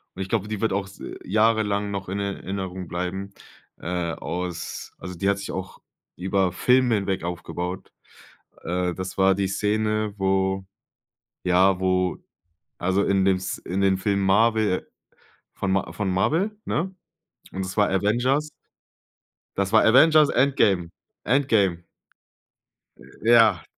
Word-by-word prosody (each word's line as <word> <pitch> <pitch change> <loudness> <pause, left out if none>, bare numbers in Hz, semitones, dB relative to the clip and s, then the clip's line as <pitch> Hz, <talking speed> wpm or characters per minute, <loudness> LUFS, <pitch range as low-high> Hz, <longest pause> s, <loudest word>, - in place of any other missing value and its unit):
und 95 - -3
ich 95 - -9
glaube, 105 -1 0
die 105 -1 -4
wird 110 -4 +1
auch 100 0 -1
s 100 - -15 0.2
jahrelang 105 -1 +1
noch 100 -2 -5
in 100 +2 -3
Erinnerung 95 -2 -4
bleiben, 90 +3 -4 0.5
äh, 85 -1 -3
aus 90 -1 -5
also 90 0 -7
die 100 +3 0
hat 100 - +1
sich 100 - -6
auch 95 0 -6 0.4
über 95 0 0
Filme 125 +4 +3
hinweg 95 -2 -2
aufgebaut. 90 +1 -5 0.7
Äh, 90 0 -1
das 95 0 -6
war 95 0 +5
die 100 0 0
Szene, 105 +1 0
wo 95 0 0 0.8
ja, 90 +1 +4
wo, 95 -1 +1 0.6
also 95 +3 +1
in 95 -1 +2
dem 95 -1 +3
S 95 0 -4
in 95 +2 -3
dem 95 -1 +3
Film 100 +1 0
Marvel 105 0 +2 0.7
von 100 - -2
Ma 95 -4 0
von 95 +2 -2
Marvel, 165 - +1
ne. 185 +5 -2 0.6
Und 95 0 -3
es 95 - -7
war 105 -1 +3
Avengers. 120 +10 +1 1.1
Das 100 0 0
war 110 - +6
Avengers 150 +6 +6
Endgame, 105 -10 +2 0.3
Endgame! 105 -9 +2 1.1
Äh, 65 - -6
ja. 110 -8 +5
95 Hz, 140 wpm, -24 LUFS, 95-110 Hz, 1.1 s, war